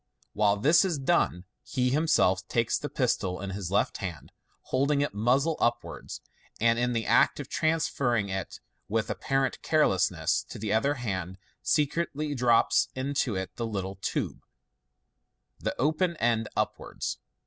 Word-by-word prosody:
While 105 -1 +3
this 155 - +5
is 180 -5 0
done, 135 - +1 0.2
he 125 -1 0
himself 135 - +2
takes 115 -1 +1
the 145 - -5
pistol 95 -8 0
in 100 0 -5
his 95 -2 -4
left 100 - +1
hand, 90 -6 -6 0.3
holding 140 +2 +1
it 145 - -1
muzzle 130 +9 +2
upwards, 120 0 -2 0.4
and 115 +1 +3
in 125 0 +1
the 115 -2 -1
act - - +4
of - - -5
transferring 140 -9 +1
it 95 -2 -5 0.3
with 110 +1 0
apparent 135 -1 -1
carelessness 150 - +2
to - - -7
the 105 0 -2
other 140 +7 +2
hand, 95 - -4 0.2
secretly 150 0 0
drops 120 -3 +3
into 130 -4 -1
it 95 0 -4
the 115 - -2
little 95 -3 -4
tube, - - -2 1.2
the - - -3
open 160 +5 +1
end 115 -3 +1
upwards. - - -3
120 Hz, 145 wpm, -28 LUFS, 100-145 Hz, 1.2 s, this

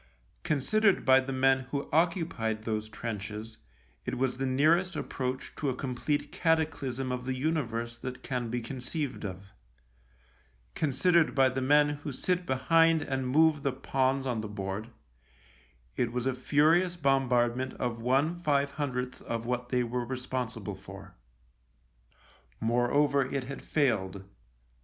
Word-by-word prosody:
Considered 195 +8 +2
by 130 0 +7
the 135 0 -4
men 135 0 +3
who 140 0 -3
occupied 160 - +1
those 110 -1 -2
trenches, 110 0 -6 0.4
it - - -3
was 130 0 0
the 135 - 0
nearest 160 +7 +3
approach 130 -3 -4
to 145 - -1
a 130 - -2
complete 140 +3 -2
cataclysm 145 -6 0
of 125 0 -3
the 130 0 -1
universe 120 -5 -2
that 130 -1 -6
can 125 -3 -2
be 120 +1 -2
conceived 130 +4 -4
of; 95 0 -7 1.2
con 155 - 0
sidered 170 +4 +3
by 135 -1 +5
the 130 +1 -3
men 145 +3 +5
who 145 - -4
sit 180 +6 -1
behind 165 +4 +3
and 130 -2 -2
move 155 +1 +4
the 140 -1 0
pawns 135 0 0
on 120 -4 -1
the 110 - -5
board, 100 +1 -4 1.1
it 120 -1 0
was 125 0 -2
a 130 - +1
furious 160 +7 +3
bombardment 130 -4 +1
of 115 -2 -3
one 135 +8 +2
five 145 -4 +1
hundredth 130 -3 -3
of 115 0 -4
what 125 0 -2
they 125 -1 +2
were 120 +1 -2
responsible 125 -4 -4
for. - - -11 1.5
Moreover, 130 +4 +2
it 135 -2 -1
had 135 +2 -7
failed. 100 -10 0
130 Hz, 145 wpm, -29 LUFS, 120-145 Hz, 1.5 s, by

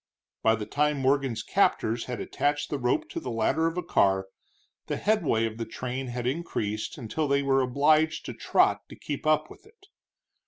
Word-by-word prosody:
By 110 0 +4
the 105 -1 -5
time 150 +6 +1
Morgan's 135 -2 +1
captors 115 +2 +1
had 125 -1 -5
attached 145 0 -1
the 145 - -1
rope 125 -1 0
to - - -4
the - - -6
ladder 120 +8 +1
of 165 +2 -3
a 180 - -1
car, 95 - +2 0.6
the - - -2
headway 170 - +1
of 110 0 -5
the 115 - -2
train 130 +3 -5
had 120 0 -4
increased 125 -7 -2
until 145 +5 -2
they 140 0 +2
were 135 -1 +3
obliged 155 +5 +2
to - - -5
trot - - +1
to - - -10
keep 145 +1 -5
up 155 0 +2
with - - -15
it. 430 -2 -23
135 Hz, 190 wpm, -27 LUFS, 115-155 Hz, 0.6 s, By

